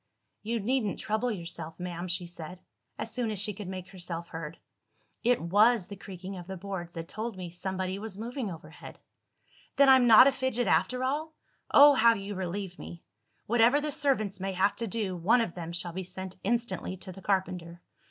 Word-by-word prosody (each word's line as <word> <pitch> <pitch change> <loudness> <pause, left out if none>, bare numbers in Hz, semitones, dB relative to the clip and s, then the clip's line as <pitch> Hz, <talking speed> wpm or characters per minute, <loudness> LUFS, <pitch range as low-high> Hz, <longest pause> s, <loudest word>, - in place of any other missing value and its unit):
"You 230 +2 -2
needn't 220 -1 0
trouble 220 +3 -1
yourself, 170 -5 -5
ma'am," 175 0 -4
she 175 0 -1
said, 175 +1 -8 0.4
as 220 +1 -4
soon 245 -3 -1
as 215 - -3
she 210 +2 -2
could 200 -1 -8
make 185 0 -6
herself 170 -2 -6
heard; 165 0 -6 0.7
"it 245 +1 +3
was 205 +5 +4
the 200 - -8
creaking 190 0 -8
of 175 -1 -9
the 190 -1 -6
boards 175 -2 -6
that 165 0 -5
told 220 +1 -5
me 180 -2 -6
somebody 185 +1 -3
was 210 -2 -7
moving 235 +1 -4
overhead." 160 -2 -10 0.8
"Then 280 -1 +6
I'm 260 -2 +7
not 230 +2 +10
a 275 - +6
fidget 260 -2 0
after 185 +11 +2
all? 305 +4 -2 0.3
Oh, 290 +1 +9
how 230 -2 +5
you 200 0 -5
relieve 190 0 -4
me! 170 - -9 0.4
Whatever 240 +5 +4
the 300 0 -2
servants 235 -10 0
may 195 +1 -2
have 190 +2 +2
to 230 - -2
do, 205 -3 -2
one 190 +8 +3
of 225 -7 -1
them 170 -2 -6
shall 175 0 -3
be 190 +2 -4
sent 185 +1 -7
instantly 235 -3 -1
to 185 - -9
the 195 +1 -11
carpenter. 180 -3 -2
195 Hz, 190 wpm, -29 LUFS, 180-230 Hz, 0.8 s, not